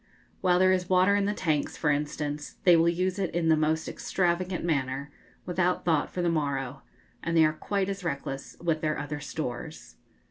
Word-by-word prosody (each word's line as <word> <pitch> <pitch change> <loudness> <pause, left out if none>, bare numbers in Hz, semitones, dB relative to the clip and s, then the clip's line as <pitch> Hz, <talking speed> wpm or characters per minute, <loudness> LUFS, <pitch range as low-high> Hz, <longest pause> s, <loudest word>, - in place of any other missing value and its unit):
While 180 -2 +3
there 185 +1 +5
is 185 -1 0
water 185 +2 +4
in 200 -1 +2
the 205 - +1
tanks, 155 -7 -1
for 150 - +2
instance, 145 0 -3
they 175 -2 +7
will 165 +1 +4
use 185 +3 -1
it 190 -3 0
in 165 -1 +1
the 160 - +6
most 155 +1 0
extravagant 180 0 -1
manner, 140 -2 -1 0.3
without 180 0 0
thought 160 -4 +2
for 180 - -3
the - - +2
morrow; 140 -4 -2 0.4
and 170 0 0
they 160 - +7
are 155 - +2
quite 195 +4 -1
as 195 -1 -4
reckless 140 -4 -4
with 165 -2 0
their 155 -1 0
other 145 +1 -4
stores. 125 - -6
165 Hz, 190 wpm, -28 LUFS, 145-180 Hz, 0.4 s, they